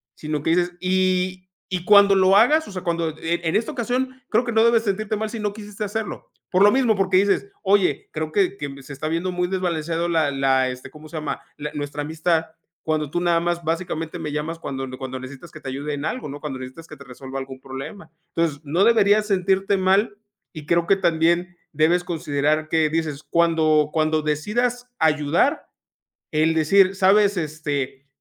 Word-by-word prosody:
sino 150 -1 -4
que 160 - +1
dices 175 +1 +2
Y 185 0 0 0.2
y 180 -2 -3
cuando 200 -1 +7
lo 190 0 +5
hagas, 305 +8 +4
o - - -9
sea, 185 -1 -6
cuando 170 -2 -1
E 170 +1 -2
en 160 - 0
esta 225 - -2
ocasión 255 +2 -2
creo 230 +3 +2
que 235 - -2
no 220 0 +4
debes 235 -1 +4
sentirte 215 +1 -1
mal 220 +1 -3
si 230 0 -6
no 210 -1 -1
quisiste 210 0 -7
hacerlo 210 +1 -4 0.2
por 185 +1 +4
lo 205 - +7
mismo, 250 -5 +3
porque 190 -1 +2
dices: 200 +1 +2 0.2
"Oye, 195 -6 +2
creo 155 0 -3
que 195 +2 +1
que 145 - -4
me 135 -1 -11
se 145 - -9
está 155 +3 -4
viendo 170 +3 -1
muy 180 0 0
desbalanceado 170 -2 -1
la 160 -4 +2
la, 135 -1 +2
este, 125 0 -8
¿cómo 155 0 -13
se 165 - -7
llama?, 155 - -4 0.2
la 150 0 -5
nuestra 145 0 -4
amistad 160 +2 0 0.4
cuando 155 -2 -1
tú 175 - 0
nada 170 -1 +3
más 170 0 -1
básicamente 165 0 -3
me 155 -2 -4
llamas 155 +3 -4
cuando 135 -3 -4
n 130 0 -8
cuando 130 -1 -6
necesitas 135 +5 -10
que 155 - -11
te 135 - -6
ayude 145 +3 -4
en 145 - -5
algo, 250 - -3
¿no?, 145 +1 -7
cuando 135 -4 -5
necesitas 130 +6 -9
que 155 - -10
te 140 - -12
resuelva 130 +2 -7
algún 130 -1 -8
problema". 135 +7 -8 0.3
Entonces 160 -3 0
no 165 +7 +1
deberías 210 -2 +4
sentirte 195 0 +1
mal 195 +3 +2 0.4
y 155 -3 -9
creo 170 0 +2
que 195 - +5
también 170 +1 +1 0.2
debes 165 +4 +2
considerar 155 -2 -1
que 160 -1 +2
dices: 155 -2 -2
"Cuando 160 -3 +3
cuando 155 -1 +1
decidas 235 +12 -1
ayudar", 160 - +2 0.6
el 155 +1 +2
decir, 190 +5 +4
¿sabes?, 200 +1 +4
este, 145 -4 -3
170 Hz, 200 wpm, -22 LUFS, 150-195 Hz, 0.6 s, cuando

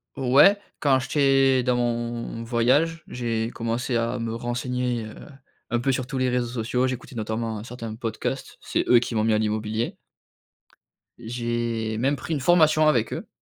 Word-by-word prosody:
O 130 -2 -2
ouais, 195 +9 +7 0.2
quand 135 -3 +3
j'étais 135 -1 +3
dans 125 0 +1
mon 120 -1 -2
voyage, 130 +8 +1
j'ai 115 -2 -2
commencé 120 +2 -2
à 115 +2 -1
me 115 -1 -3
renseigner, 120 0 -2
heu, 110 - -9 0.6
un 120 - +1
peu 135 +3 +1
sur 130 -1 -2
tous 135 0 -4
les 130 0 +1
réseaux 125 -1 0
sociaux. 125 +2 -1
J'écoutais 130 0 -6
notamment 110 -1 -3
certains 115 -1 -7
podcasts. 115 -2 -4
C'est - - -1
eux 120 - +7
qui 120 0 -4
m'ont 110 -1 +1
mis 110 0 +2
à - - +3
l'immobilier. 110 +1 -2 1.2
J'ai 120 -1 -2
même 135 +5 +1
pris 140 +5 -5
une - - -2
formation 155 0 +4
avec 120 -7 +2
eux. - - -5
120 Hz, 170 wpm, -24 LUFS, 115-130 Hz, 1.2 s, ouais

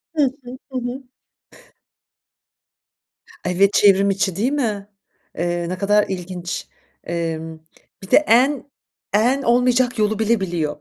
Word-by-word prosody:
Hı 300 - +3 0.2
hı. 250 +1 -9
Hı 260 - -3
hı. 245 +2 -5 2.4
Evet, 195 +3 +2
çevrimiçi 195 -2 +3
değil 230 +7 0
mi? 215 -9 -2 0.5
Eee, 175 +1 -1
ne 185 - -3
kadar 205 +2 +3
ilginç. 180 -1 -5 0.4
Emm, 165 -1 -4 0.5
bir 190 - -11
de - - +8
en 270 +4 +3 0.4
en 245 +7 +3
olmayacak 245 0 +2
yolu 210 0 +1
bile 225 +1 +2
biliyor. 165 -6 -2
205 Hz, 115 wpm, -20 LUFS, 180-245 Hz, 2.4 s, de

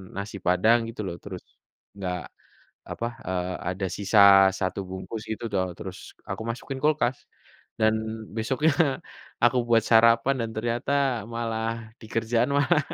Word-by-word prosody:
nasi 100 +1 -5
padang 95 +6 +5
gitu 115 - -6
loh 85 -1 -5
terus, 95 -3 -8 0.5
enggak 90 -2 -3 0.7
apa, 115 - -3 0.2
eee, 90 0 -2 0.2
ada 95 +1 -3
sisa 100 +1 +3 0.4
1 95 0 -1
bungkus 95 +4 -6
gitu 110 +2 -4
toh 95 -2 +1
terus 95 -4 -7 0.3
aku - - -4
masukin 130 +3 -5
kulkas, 150 -4 +2 0.6
dan 110 0 +4 0.4
besoknya, 130 +8 +1 0.7
aku 120 +1 +4
buat 115 -1 +4
sarapan 115 +3 +5
dan 115 - -2
ternyata 120 +4 -1 0.4
malah 115 -1 -3
di 110 - -11
kerjaan 115 +3 +1
malah, 145 +2 +3
110 Hz, 135 wpm, -26 LUFS, 100-120 Hz, 0.7 s, padang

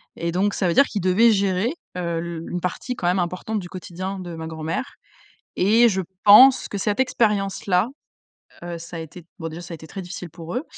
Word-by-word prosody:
Et 170 0 -2
donc 195 +4 +1
ça 185 - 0
veut 170 - +1
dire 280 - +6
qu'ils 205 -6 -4
devaient 190 +6 +5
gérer, 200 +4 +1 0.2
heu, 170 -2 -2
le 170 -1 -5
une 180 - -3
partie 185 +8 -3
quand 175 - -2
même 180 +2 +2
importante 185 +5 -2
du 175 -2 -8
quotidien 185 +2 -6
de 175 -2 -7
ma 160 0 -6
grand-mère 160 +6 -4 0.6
et 225 +5 +5
je 190 -3 0 0.2
pense 250 +6 +8
que 200 - -4
cette 205 +4 0
expérience-là, 200 -5 +1 0.8
heu, 175 -1 -5
ça 170 +1 -8
a - - -5
été 165 +1 -10
bon, 165 - -4
déjà, 165 +2 -8
ça 175 0 -8
a - - -4
été 160 0 -12
très 195 +5 -7
difficile 180 -1 -7
pour 165 +1 -9
eux, 255 - -1
180 Hz, 215 wpm, -23 LUFS, 170-205 Hz, 0.8 s, pense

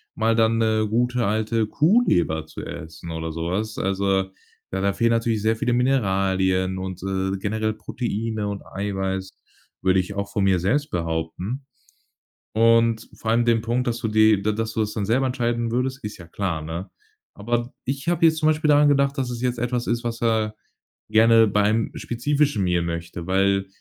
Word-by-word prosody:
mal 115 0 +2
dann, 115 0 +3
'ne 110 -1 +2
gute, 125 +2 +1
alte 110 +2 0
Kuhleber 125 - +2
zu - - -8
essen 80 +1 -8
oder 80 0 -4
so 85 +1 -4
was. 110 +3 -2
Also, 95 0 0 0.4
ja, 95 - -1
da 100 0 +2
fehlen 115 +1 +2
natürlich 115 -1 +1
sehr 110 +2 +2
viele 120 +2 -1
Mineralien 95 -7 +1
und, 95 -1 -5
äh, 95 0 -1
generell 110 +2 -1
Proteine 110 -1 -3
und 100 -1 -5
Eiweiß, 95 -1 -3 0.5
würde 95 0 +3
ich 90 +2 -7
auch 100 -1 -3
von 100 - 0
mir 95 -2 +3
selbst 145 - 0
behaupten. 85 - -3 0.9
Und 115 0 +3
vor 110 - -2
allem 120 +1 +3
den 115 -2 +3
Punkt, 120 +2 -1
dass 120 0 -1
du 110 - -2
die, 110 -1 +4
d 105 +2 +1
dass 110 +1 -3
du 110 - 0
das 105 -1 -1
dann 105 -2 -2
selber 130 +6 +2
entscheiden 120 -2 -1
würdest, 130 +2 -2
ist 105 0 -6
ja 85 - -12
klar, 85 -3 -3
ne? 85 +5 -6 0.5
Aber 120 +4 -2
ich 135 +5 -2
habe 170 -1 +3
jetzt 160 0 +2
zum 155 - -1
Beispiel 155 0 +2
daran 145 0 +6
gedacht, 140 0 +2
dass 130 -2 -1
es 120 -1 -5
jetzt 125 -1 0
etwas 120 0 -1
ist, 120 +1 -1
was 115 0 -4
er 110 -2 +1 0.6
gerne 115 +1 +6
beim 105 +2 +1
spezifischen 140 -1 0
Meal 90 -1 +1
möchte, 85 0 -5
weil 95 +1 +2
110 Hz, 185 wpm, -23 LUFS, 95-120 Hz, 0.9 s, daran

